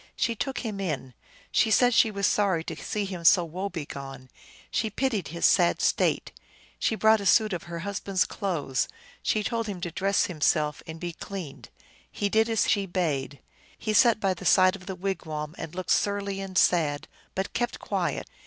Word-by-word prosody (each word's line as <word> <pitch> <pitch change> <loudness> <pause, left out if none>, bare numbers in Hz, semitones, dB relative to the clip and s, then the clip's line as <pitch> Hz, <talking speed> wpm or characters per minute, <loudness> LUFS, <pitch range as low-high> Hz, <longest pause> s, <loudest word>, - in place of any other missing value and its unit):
She 230 - 0
took 265 +4 -3
him 215 -4 -4
in; 150 -9 -3 0.4
she 225 - +3
said 245 +3 +4
she 225 - +5
was 200 -2 -1
sorry 190 -6 +2
to - - -5
see 210 -1 -3
him 185 -3 -6
so 170 +1 +6
woe 185 +5 -4
begone; 135 -6 -7 0.4
she 220 - 0
pitied 220 - -1
his 170 +3 -2
sad 175 -2 +4
state; - - +1 0.5
she 225 - +1
brought 220 0 +4
a - - -5
suit 215 -1 +4
of 175 - -3
her 170 -1 -5
husband 200 +1 -5
s 185 - +4
clothes; 160 - -2 0.3
she 215 - 0
told 230 0 -2
him 195 -3 -5
to 175 -1 -3
dress 195 +4 +1
himself 150 -3 0
and 160 0 -7
be 175 0 -4
cleaned. 185 -5 -8 0.4
He 205 - -1
did 220 +2 +3
as 225 -2 +2
she 200 -1 +1
bade. 150 -7 -2 0.4
He 215 - -2
sat 230 +1 +5
by 195 -2 +1
the 175 - -10
side 185 0 +5
of 185 -2 -13
the 190 - -4
wigwam, 160 -5 -4
and 165 +1 -7
looked 185 -1 -3
surly 200 -1 0
and 190 -1 -5
sad, 155 -4 +2 0.3
but 190 0 -3
kept 240 0 -1
quiet. - - -2
190 Hz, 190 wpm, -27 LUFS, 165-205 Hz, 0.5 s, so